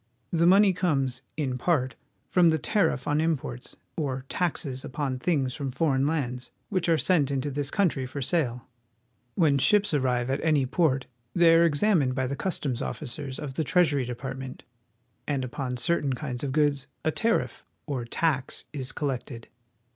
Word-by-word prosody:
The 170 0 +3
money 195 +1 +6
comes, 135 -8 0 0.2
in 130 -5 -2
part, 130 -5 +1 0.3
from 175 -2 +4
the 160 - +2
tariff 130 - 0
on 145 +1 +2
imports, 140 - -3 0.2
or 135 -4 -3
taxes 145 -7 -2
upon 130 -1 -3
things 135 -5 0
from 140 -1 -3
foreign 135 0 +1
lands 130 -5 -2 0.2
which 185 -4 0
are 165 - +4
sent 155 -5 +2
into 140 +1 -1
this 140 +1 -1
country 155 -10 +1
for 140 - -6
sale. 130 -4 -1 0.7
Wlien 145 -6 +3
ships 205 +6 +4
arrive 130 -3 +1
at 135 - -1
any 155 -4 +3
port 135 -2 +1 0.3
they 170 -1 +6
are 165 +1 +6
examined 150 -4 +2
by 130 -1 0
the 135 +2 -2
customs 140 -8 -2
officers 135 -1 -4
of 145 -3 -5
the 160 - -1
Treas 175 +2 +3
ury 140 -3 0
Department, 130 +1 -6 0.6
and 140 -3 -1
upon 125 0 -4
certain 145 0 +1
kinds 125 -1 -4
of 140 - -1
goods 145 -1 +1 0.2
a 160 - +3
tariff, 230 +7 0 0.2
or 135 -5 -3
tax, 130 +2 -1
is 135 -3 -3
collected. 130 -4 -4
140 Hz, 165 wpm, -27 LUFS, 130-165 Hz, 0.7 s, money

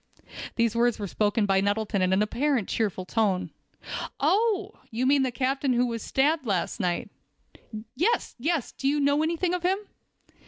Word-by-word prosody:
These 230 -1 +1
words 240 0 +2
were 205 - -4
spoken 205 +2 +1
by 195 -1 +3
Nettleton 205 0 0
in 185 0 +2
an 190 +2 +3
apparently 255 +1 0
cheerful 200 -4 -2
tone. 200 -3 0 0.7
"Oh! 415 -1 +2 0.2
you 235 +3 -1
mean 275 +1 +4
the 260 - +1
captain 265 +2 0
who 245 +1 +3
was 230 -2 -3
stabbed 300 +7 +1
last 195 +2 -1
night." 180 -4 -1 0.8
"Yes, 430 - +1
yes; 310 0 -1
do 270 - -3
you 295 +2 +2
know 285 +1 +3
any 325 +2 0
thing 360 +1 0
of 360 - -1
him?" 370 +2 +2
245 Hz, 170 wpm, -26 LUFS, 210-300 Hz, 0.8 s, mean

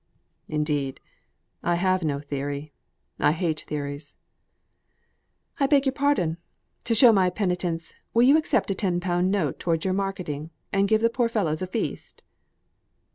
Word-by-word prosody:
"Indeed 150 -3 -1 0.6
I 175 - +1
have 185 +1 +1
no 145 -4 -1
theory; 145 +1 -5 0.5
I 150 - +4
hate 160 -2 -1
theories." 145 0 -5 1.4
"I 275 - +3
beg 280 -1 +4
your 265 - +1
pardon. 270 - +1 0.5
To 230 - +1
show 235 +1 +8
my 190 -4 +3
penitence, 180 -3 -2 0.2
will 235 - +4
you 270 +4 +7
accept 310 -9 +1
a - - +2
ten 185 -3 0
pound 175 0 0
note 190 -8 0
towards 165 -1 -1
your 185 - +1
marketing, 180 -6 -3 0.2
and 200 0 +3
give 220 +1 +3
the 230 0 +3
poor 240 -1 +1
fellows 175 -9 -1
a 185 - -2
feast?" 220 +5 -4
180 Hz, 150 wpm, -25 LUFS, 155-210 Hz, 1.4 s, show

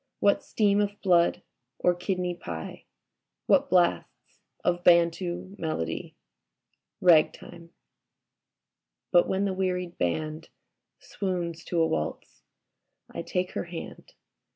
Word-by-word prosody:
What 200 - +3
steam 205 -1 +2
of 205 0 -2
blood 175 -3 +3 0.3
or 180 - +3
kidney 180 0 -2
pie? 85 - -8 0.6
What - - +3
blasts 175 -2 0 0.2
of 175 0 0
Bantu 175 +2 +2
melody? 80 - -3 0.9
Ragtime.... 170 0 +2 1.4
But 175 - +5
when 190 +1 0
the 195 - -1
wearied 180 -2 -2
Band 155 - -2 0.5
Swoons 175 -4 -4
to 175 - -1
a 165 - +4
waltz, 80 - -4 0.7
I - - -4
take 180 0 -2
her - - -3
hand. 170 -1 -9
175 Hz, 105 wpm, -27 LUFS, 165-185 Hz, 1.4 s, But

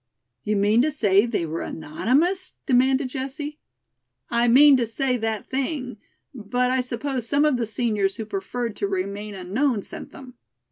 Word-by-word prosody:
"You 210 - 0
mean 205 +3 +3
to 300 - +2
say 210 -7 +3
they 215 -7 -1
were 160 +1 -4
anonymous?" 290 - -1
demanded 260 +1 +3
Jessie. 285 +3 -5 0.7
"I 235 0 +2
mean 275 +4 +7
to 240 -2 0
say 255 +3 0
that 220 -2 -2
thing, 265 -3 -3 0.4
but 250 +2 -1
I 260 0 +2
suppose 250 0 -3
some 285 +5 +3
of 295 -4 +2
the 235 -2 -2
seniors 210 -3 0
who 225 - -5
preferred 245 - -4
to 200 - -1
remain 200 +2 -4
unknown 205 +5 -1
sent - - -9
them." 260 -2 -12
245 Hz, 160 wpm, -24 LUFS, 210-270 Hz, 0.7 s, mean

